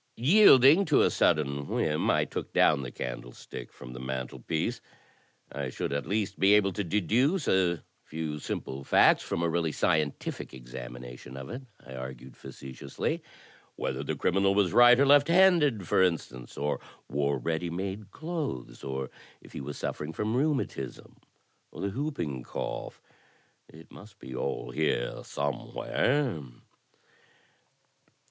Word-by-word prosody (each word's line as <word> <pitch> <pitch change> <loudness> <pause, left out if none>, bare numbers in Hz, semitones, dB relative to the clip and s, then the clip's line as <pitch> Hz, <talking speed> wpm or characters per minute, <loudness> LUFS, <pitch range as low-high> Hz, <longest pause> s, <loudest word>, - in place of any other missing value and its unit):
Yielding 150 - +7
to 150 -6 +4
a - - +3
sudden 70 -2 +1
whim, 75 0 0
I - - +3
took - - -6
down 75 -2 +4
the 65 - -5
candlestick - - -7
from 60 0 -11
the 65 - -8
mantelpiece. 65 -1 -3 0.7
''I 70 -2 -4
should 70 - -3
at 70 0 -2
least 100 +1 -1
be 100 +2 +6
able 100 -2 +3
to 100 - -2
deduce 115 - +1
a 90 -3 +2 0.2
few 80 -1 -4
simple 70 -1 -5
facts - - +5
from 85 - -2
a - - +2
really 85 -1 0
scientific 75 -5 -1
examination - - -9
of 65 - -7
it," 125 +3 -5 0.2
I 65 - -10
argued, 65 0 -8
facetiously 65 -1 -5 0.3
— - - -28
"whether - - -3
the - - -3
criminal 95 +2 +2
was 100 -4 +2
right 120 +1 +8
or 140 - +5
left 145 +1 +6
handed, 165 - +4
for - - +3
instance, 80 -8 -1
or 75 +1 -1 0.3
wore 70 0 0
ready 80 +6 -2
made 95 +4 -4
clothes, 150 - -5
or 65 -1 -4 0.3
if - - -17
he - - -5
was 70 +1 -6
suffering 75 +2 -4
from 105 +6 -1
rheumatism 135 - -2 0.5
or - - -12
the 100 - -1
whoop 145 +7 -3
ing 70 -6 -3
cough. - - -6 0.7
It 80 +1 -15
must 100 0 -14
be 65 - -10
all 60 -1 -3
here 75 -5 -1
somewhere." 105 - -1
80 Hz, 145 wpm, -29 LUFS, 65-110 Hz, 0.7 s, right